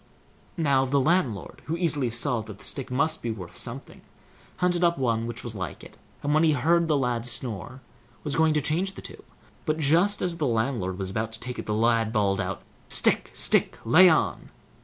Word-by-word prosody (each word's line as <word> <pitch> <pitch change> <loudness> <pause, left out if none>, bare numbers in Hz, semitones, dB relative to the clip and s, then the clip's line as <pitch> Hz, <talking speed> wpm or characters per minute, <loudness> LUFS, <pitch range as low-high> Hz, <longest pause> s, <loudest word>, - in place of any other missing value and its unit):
Now 140 -5 +3
the 135 +2 +1
landlord, 135 - 0
who 165 +2 -2
easily 150 -7 0
saw 120 +1 0
that 105 -2 -10
the - - -13
stick 135 - -3
must 155 +5 0
be 120 - -3
worth 95 -6 -7
something, - - -8 0.6
hunted 180 -1 +1
up 170 0 +3
one 115 -3 0
which 120 0 -6
was 120 - -5
like 90 -7 -6
it, - - -13 0.3
and 145 +1 +1
when 155 - +4
he 155 -2 +4
heard 165 +5 +2
the 155 -2 +2
lad 125 -3 -1
snore, 125 +1 -4 0.4
was 145 -3 -2
going 160 -1 +3
to 150 - +2
change 175 +7 0
the - - -10
two; - - -11 0.4
but, 155 -2 -1
just 170 +7 +3
as 175 -2 0
the 150 -4 0
landlord 110 -6 -1
was 95 -1 -4
about 110 +3 -2
to 110 - -9
take 125 0 -6
it, - - -6
the 105 - 0
lad 115 0 +2
bawled 100 -3 +1
out: 95 -1 -4 0.3
"Stick, - - +2
stick! - - +2
lay 180 +10 +7
on!" 160 - 0
130 Hz, 205 wpm, -26 LUFS, 115-160 Hz, 0.6 s, lay